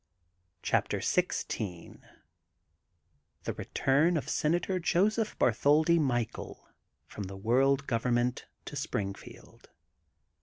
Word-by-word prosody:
CHAPTER - - +1
XVI 90 -5 -2 1.5
THB - - -2
BBTURN 155 +6 +1
OF 150 - -4
SENATOR 175 +4 0
JOSEPH 205 +6 +1
BABTHOLDI 150 +8 +3
MICHAEL 120 -6 -2 0.4
FBOM 100 -2 -6
THE 95 +1 -8
WOBLD 135 +6 +2
GOVERNMENT 120 0 0 0.2
TO - - -7
SPBINGFIELD. 100 -1 -6
135 Hz, 85 wpm, -30 LUFS, 115-165 Hz, 1.5 s, BABTHOLDI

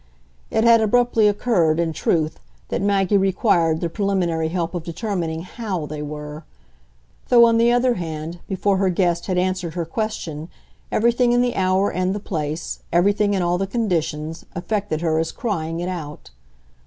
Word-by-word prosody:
It 220 - +1
had 230 -1 +6
abruptly 230 0 +3
occurred, 200 -7 +2
in 165 -1 0
truth, 155 -1 0 0.3
that - - -1
Maggie 200 0 +2
required 180 -4 +2
the 170 - 0
preliminary 175 -4 0
help 170 0 -2
of 175 - -3
determining 170 -2 -3
HOW 185 -5 -4
they 150 0 -6
were; 150 +1 -7 0.9
though, 235 -2 +7
on 230 0 +3
the 235 +1 +4
other 245 +1 +3
hand, 165 -2 -5
before 195 +1 +1
her 190 0 +2
guest 175 -1 0
had 185 -2 0
answered 180 -2 -1
her 170 -2 -2
question 165 -5 -4 0.4
everything 240 +2 +3
in 245 0 +3
the 245 -1 -1
hour 190 +1 +2
and 185 +2 -1
the - - -3
place, 155 -4 -4
everything 205 +4 +2
in 185 - 0
all 175 +1 +1
the 195 - -1
conditions, 165 -7 -2
affected 185 -2 -2
her 160 -2 +1
as 165 0 -1
crying 165 -7 -3
it 175 - -3
out. 155 - -7
180 Hz, 165 wpm, -22 LUFS, 165-205 Hz, 0.9 s, though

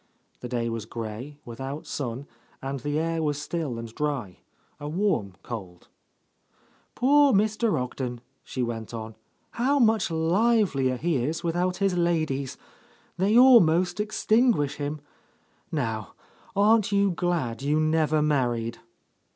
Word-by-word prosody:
The 125 - -7
day 120 -1 -1
was 115 -2 -4
grey, 115 +6 -6
without 135 +5 -6
sun, 130 -1 -4 0.3
and 135 +1 -4
the 145 +4 -2
air 165 +1 0
was 145 -2 -1
still 150 -5 -3
and 115 -1 -7
dry, 140 - -3 0.4
a 145 0 -5
warm 160 - 0
cold. 95 -7 -8 1.1
"Poor 285 +3 +5
Mr. 215 - +2
Ogden," 125 -1 -4 0.2
she 130 - -3
went 115 -1 -4
on, 110 -1 -7 0.4
"how 265 +5 +1
much 225 -6 +3
livelier 165 - +2
he 165 +2 0
is 155 +8 -2
without 175 +2 0
his 195 -2 +1
ladies 155 -6 0 0.6
I 190 - +2
They 215 +3 +4
almost 185 -8 +6
extinguish 215 - +2
him. 145 +1 -4 0.7
Now 110 -4 -3 0.4
aren't 210 0 +4
you 200 -1 +3
glad 165 -9 -1
you 145 +2 +1
never 155 -1 +2
married?" 120 -6 0
150 Hz, 130 wpm, -26 LUFS, 125-190 Hz, 1.1 s, almost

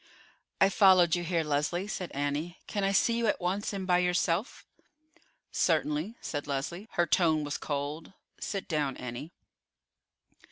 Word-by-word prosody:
"I 195 - +6
followed 185 -4 +5
you 175 - -2
here, 170 -1 0
Leslie," 150 +6 -1
said 185 -4 -4
Annie. 145 +5 -2
"Can 205 -2 -2
I 195 - +2
see 230 +4 +3
you 235 -1 +1
at - - +1
once, 190 +3 -1
and 195 -2 -4
by 180 -1 +3
yourself?" 180 +3 0 0.9
"Certainly," 160 +4 +1
said 145 -1 -4
Leslie. 145 +9 -3
Her 175 - +2
tone 160 -2 +3
was 145 -1 -3
cold. 145 +3 -4 0.3
"Sit 195 -2 -4
down, 145 -5 -1
Annie." 125 +6 -6
175 Hz, 150 wpm, -30 LUFS, 150-190 Hz, 0.9 s, I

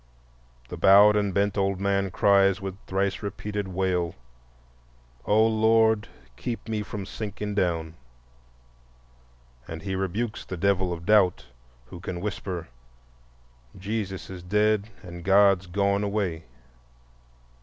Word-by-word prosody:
The - - -6
bowed 100 +2 +7
and 100 -1 +1
bent 100 +1 0
old 95 -1 0
man 100 0 0
cries, 100 +1 +3
with 95 -2 -5
thrice 95 0 -1
repeated 105 0 -4
wail: 90 -2 -1 1.1
"O 110 +2 +4
Lord, 110 0 +3 0.3
keep 115 -2 -5
me 110 -1 -2
from 105 -1 -6
sinking 105 0 -5
down," 85 -5 -1 1.7
and 80 0 -7
he 95 -1 -3
rebukes 95 +5 -3
the 95 - -7
devil 95 -1 +1
of 85 -1 -6
doubt 105 -7 +3 0.4
who 85 - -9
can 90 0 -5
whisper: 95 -3 -4 1.1
"Jesus 100 -1 -4
is 90 -2 -8
dead 105 +3 +1
and 85 -2 -9
God's 95 -1 +4
gone 100 +2 0
away." 100 -5 -2
100 Hz, 120 wpm, -26 LUFS, 95-105 Hz, 1.7 s, bowed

